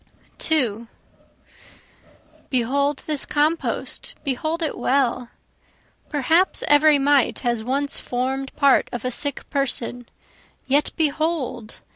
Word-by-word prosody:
2 235 -8 +1 1.6
Behold 275 +3 0
this 300 -3 -2
compost! 305 +3 -1
behold 310 +5 -2
it 310 - -2
well! 250 -2 0 0.8
Perhaps 320 +6 +2
every 295 0 +6
mite 280 -2 +2
has 235 -3 0
once 275 +4 -1
form'd 265 +2 -3
part 280 -2 +3
of 245 0 -5
a 255 - 0
sick 285 +2 -1
person 245 -4 -1 0.6
yet 280 +3 +2
behold! 295 -7 -2
275 Hz, 100 wpm, -22 LUFS, 250-295 Hz, 1.6 s, every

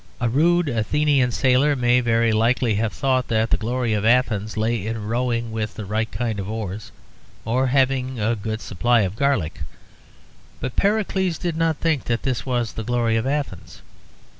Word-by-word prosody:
A 120 - 0
rude 170 +6 +3
Athenian 135 +2 +1
sailor 130 +4 +2
may 125 -1 +3
very 115 -1 +2
likely 115 +1 +2
have 110 +1 0
thought 130 -2 0
that 110 0 0
the - - +3
glory 120 0 -1
of 105 -1 -1
Athens 110 -3 +1
lay 110 -1 0
in 110 -2 -4
rowing 115 0 -1
with 110 -1 -3
the 110 - -6
right 110 +3 -2
kind 115 -4 -2
of 100 +1 -5
oars, 105 -1 -5 0.5
or 125 +4 +1
having 130 -1 +1
a 110 +3 +1
good 110 +1 -4
supply 120 +5 +1
of 95 -1 -2
garlic; 120 - 0 1.0
but 130 -2 -5
Pericles 195 -4 +1
did 175 -3 -3
not 165 -1 +1
think 160 -5 0
that 120 -1 -1
this 130 -1 -2
was 120 -3 -1
the 110 - -5
glory 120 0 0
of 115 +3 0
Athens. 140 -10 -4
120 Hz, 175 wpm, -22 LUFS, 110-130 Hz, 1.0 s, rude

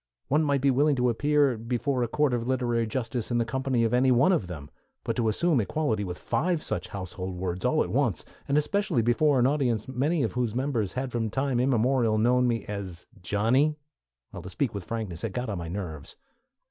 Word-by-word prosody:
One 150 +3 +3
might 140 -2 +1
be 140 0 +4
willing 145 +3 +3
to 125 -1 +2
appear 145 +1 +2
before 125 +3 -1
a 120 - +1
Court 150 +2 +1
of 120 -1 -2
Literary 120 -3 0
Justice 120 0 -3
in 120 - 0
the 115 - +1
company 130 0 0
of 115 +1 +1
any 130 +1 +4
one 130 +9 +4
of 115 - +1
them, 75 -5 -8 0.3
but - - -2
to 115 -2 +2
assume 150 +4 +2
equality 110 -3 -1
with 90 -2 -5
five 175 -1 -1
such 95 -4 -2
household 95 -1 -6
words 90 0 -3
all - - +3
at - - -6
once, - - 0 0.2
and 140 - +2
especially 150 - +1
before 135 +5 +3
an 125 - +3
audience 130 -6 +1
many 140 +5 0
of - - -1
whose 120 -3 -1
members 125 -7 -1
had 130 0 -3
from 115 -2 -1
time 135 0 0
immemorial 125 -2 +2
known 125 +3 +3
me 115 -3 -1
as 95 -4 -6 0.2
"Johnny" 115 +11 +2 0.6
well, - - -8
to 90 - -8
speak 130 +5 -2
with 100 -4 -6
frankness, 110 -7 -4
it 110 -4 -3
got 125 -1 -3
on 100 -4 -3
my 85 - -5
nerves. 85 -5 -6
120 Hz, 210 wpm, -27 LUFS, 105-135 Hz, 0.6 s, be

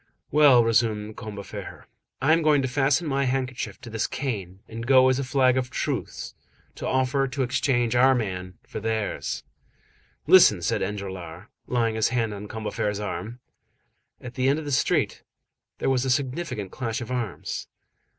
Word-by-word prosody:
"Well," 140 -5 +6
resumed 110 -2 +1
Combeferre, 100 -2 -8 0.4
"I 160 - +5
am 165 - +3
going 150 -3 +3
to - - 0
fasten 135 +5 +2
my 140 -1 +1
handkerchief 130 0 -2
to 120 - -9
my 115 - -5
cane, 100 -8 -4
and 115 +1 -7
go 130 -1 +6
as 130 +1 +1
a - - -1
flag 130 -1 +3
of 125 -1 -3
truce, - - -3 0.4
to - - -5
offer 130 +1 +1
to 135 +1 -2
exchange 125 -2 +1
our 130 +2 +5
man 90 -5 -3
for - - -7
theirs." 110 -1 -2 0.8
"Listen," - - +7
said - - 0
Enjolras, 95 -4 -5 0.2
laying 115 -2 +1
his 110 -1 +1
hand 115 -3 0
on 105 +1 -7
Combeferre's 105 -1 -3
arm. 105 +4 -5 0.8
At 125 0 -9
the 130 0 0
end 140 - +2
of 155 - -5
the 145 - -4
street 130 - +1 0.6
there - - -2
was 130 -1 +2
a 135 - -1
significant 130 - -2
clash 115 -4 -3
of 120 +1 -6
arms. 120 -6 -4
125 Hz, 165 wpm, -25 LUFS, 110-135 Hz, 0.8 s, Listen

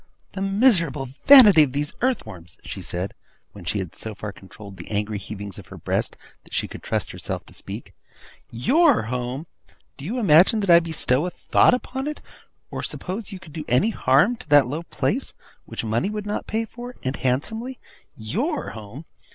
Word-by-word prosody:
'The 190 - -6
miserable 195 - +2 0.2
vanity 225 - +10
of 140 -4 +2
these 145 +1 -2
earth 255 0 +1
worms!' 90 -5 -12
she - - -7
said, 90 +2 -3 0.4
when 100 - -12
she 85 - -2
had 95 -4 -4
so 110 -1 -7
far 105 +1 -6
controlled 100 0 -13
the 85 - -10
angry 105 0 -2
heavings 100 -1 -7
of - - -13
her - - -11
breast, - - -2 0.3
that - - -9
she - - 0
could - - -10
trust - - -2
herself - - -5
to - - -17
speak. - - -8 0.6
'YOUR 275 - +3
home! 125 +5 -4 0.5
Do 140 - -9
you 225 +9 -3
imagine 195 0 +5
that 200 -3 +2
I 170 - +9
bestow 160 -3 0
a - - -1
thought 250 +7 +2
on 265 +2 -2
it, 300 - -4 0.5
or - - -4
suppose 200 +4 -5
you 195 - -6
could 165 -5 -14
do 155 - -5
any 160 - +3
harm 180 - +3
to 160 - -14
that 145 -1 +7
low 145 +6 -4
place, 170 - -2 0.3
which - - -5
money 115 - 0
would 210 -1 -4
not 210 - -3
pay 225 +1 -1
for, 245 +2 -9
and 130 +1 -2
handsomely? 220 - -1 0.4
YOUR 235 - -2
home! 110 +8 -10
155 Hz, 190 wpm, -23 LUFS, -, 0.6 s, vanity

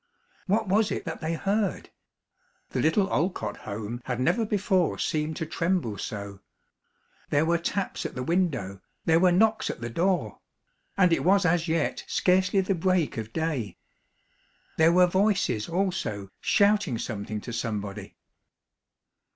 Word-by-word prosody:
What 210 +3 +1
was 210 +3 +3
it - - -3
that 165 - -5
they 160 +1 -1
heard? 200 +3 -1 0.8
The - - -2
little 190 +5 +3
Olcott 150 - -1
home 110 +4 -6
had 125 -1 -3
never 220 - +1
before 195 -4 +1
seemed 155 0 -1
to 160 - -3
tremble 165 - -1
so. 100 -2 -6 0.9
There 145 +2 +2
were 170 +1 +2
taps 190 +3 -2
at - - -5
the 125 - -3
window, 135 - -1 0.2
there 165 0 +4
were 180 0 +5
knocks 220 +5 +2
at - - -5
the 120 0 -5
door 180 +7 0 0.6
and 180 -3 +5
it - - +1
was 195 +1 +4
as 175 0 +2
yet 160 -1 0
scarcely 185 +1 +2
the 190 +1 0
break 180 -4 0
of 110 0 -5
day! 140 - -2 1.0
There 160 +1 +5
were 180 +1 +6
voices 185 - +1
also, 175 - -2
shouting 200 - +2
something 105 -2 -4
to 120 +3 -8
somebody. 105 -3 -4
165 Hz, 145 wpm, -27 LUFS, 120-190 Hz, 1.0 s, were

